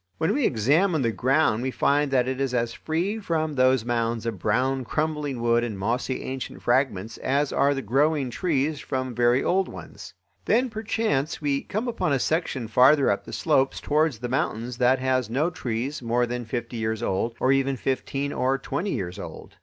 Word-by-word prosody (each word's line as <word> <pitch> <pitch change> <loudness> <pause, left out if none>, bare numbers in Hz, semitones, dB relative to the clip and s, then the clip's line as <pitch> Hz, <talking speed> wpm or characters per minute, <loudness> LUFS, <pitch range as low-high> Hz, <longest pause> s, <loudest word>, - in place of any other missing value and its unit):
When 160 +5 +1
we 280 0 +2
examine 145 - +2
the 115 - +1
ground 130 -1 +2
we 130 - -1
find 145 +2 +1
that 130 -2 +2
it 130 +1 -2
is 130 -2 -1
as 115 -1 0
free 180 +7 -2
from 160 -6 -1
those 130 -3 +3
mounds 115 -1 -1
of 110 -5 -3
brown 130 +7 +1
crumbling 150 -1 -2
wood 120 0 +2
and 110 -4 -3
mossy 120 +6 -2
ancient 130 0 -6
fragments 120 -5 0
as 140 +2 0
are 140 0 +3
the 135 - -4
growing 140 +3 +1
trees 150 0 0
from 130 -2 -3
very 120 +2 +3
old 190 +1 +1
ones. - - -10 0.3
Then 245 +2 +2
perchance, 215 -9 -1
we 140 -2 0
come 220 +5 -3
upon 230 -11 0
a - - +3
section 135 -4 -1
farther 130 +4 +5
up 100 - -2
the - - -9
slopes 135 -4 +1
towards 150 -3 +1
the 120 +3 -4
mountains 120 -1 -2
that 125 +1 +4
has 130 -2 0
no 145 +9 0
trees 125 +1 -3
more 120 +1 +1
than 120 0 -4
fifty 120 +1 -4
years 110 0 -2
old, 115 +3 -1
or 130 - +3
even 135 0 +2
fifteen 135 +3 -2
or 130 +1 +1
twenty 140 +8 -3
years 90 -6 -4
old. - - -9
130 Hz, 190 wpm, -25 LUFS, 120-150 Hz, 0.3 s, farther